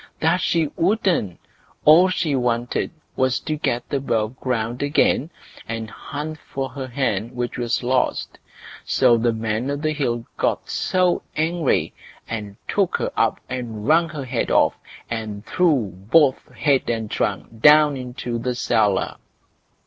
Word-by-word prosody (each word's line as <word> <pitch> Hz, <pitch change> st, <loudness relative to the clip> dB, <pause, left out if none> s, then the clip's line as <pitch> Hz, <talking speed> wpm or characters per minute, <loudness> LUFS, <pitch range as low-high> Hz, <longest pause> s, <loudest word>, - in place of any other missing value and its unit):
that 170 Hz, +3 st, +2 dB
she 170 Hz, -2 st, +2 dB
wouldn't; 180 Hz, -, +1 dB, 0.5 s
all 170 Hz, +5 st, +7 dB
she 165 Hz, -5 st, 0 dB
wanted 120 Hz, -1 st, 0 dB, 0.3 s
was 130 Hz, -1 st, +1 dB
to 155 Hz, -, -3 dB
get 120 Hz, -5 st, -1 dB
above 115 Hz, -4 st, 0 dB
ground 120 Hz, -1 st, -2 dB
again, 145 Hz, +1 st, +2 dB, 0.4 s
and 115 Hz, -1 st, -5 dB
hunt 150 Hz, +2 st, -6 dB
for 135 Hz, -1 st, -5 dB
her 130 Hz, 0 st, -6 dB
hen 120 Hz, -3 st, -2 dB
which 120 Hz, 0 st, -3 dB
was 120 Hz, 0 st, -1 dB
lost. 125 Hz, +1 st, 0 dB, 0.4 s
So 120 Hz, -, +4 dB
the 115 Hz, +1 st, +2 dB
Man 110 Hz, +3 st, -2 dB
o' 145 Hz, -, 0 dB
the 155 Hz, +2 st, -1 dB
Hill 120 Hz, -6 st, -1 dB
got -, -, -1 dB, 0.6 s
angry, 160 Hz, -1 st, +1 dB, 0.3 s
and 105 Hz, -3 st, -5 dB
took -, -, +1 dB
her -, -, -2 dB
up -, -, +1 dB
and 115 Hz, -4 st, -5 dB
wrung 165 Hz, +2 st, +4 dB
her 150 Hz, -3 st, -6 dB
head 125 Hz, -2 st, -2 dB
off, -, -, +4 dB, 0.3 s
and 110 Hz, -2 st, -5 dB
threw 145 Hz, -, +2 dB, 0.2 s
both 145 Hz, -4 st, +4 dB
head 140 Hz, -3 st, +1 dB
and 115 Hz, -2 st, -2 dB
trunk 115 Hz, -1 st, -3 dB
down 150 Hz, 0 st, +7 dB
into 125 Hz, -2 st, -5 dB
the 125 Hz, +1 st, -2 dB
cellar. 105 Hz, -5 st, +1 dB
125 Hz, 140 wpm, -22 LUFS, 115-150 Hz, 0.6 s, all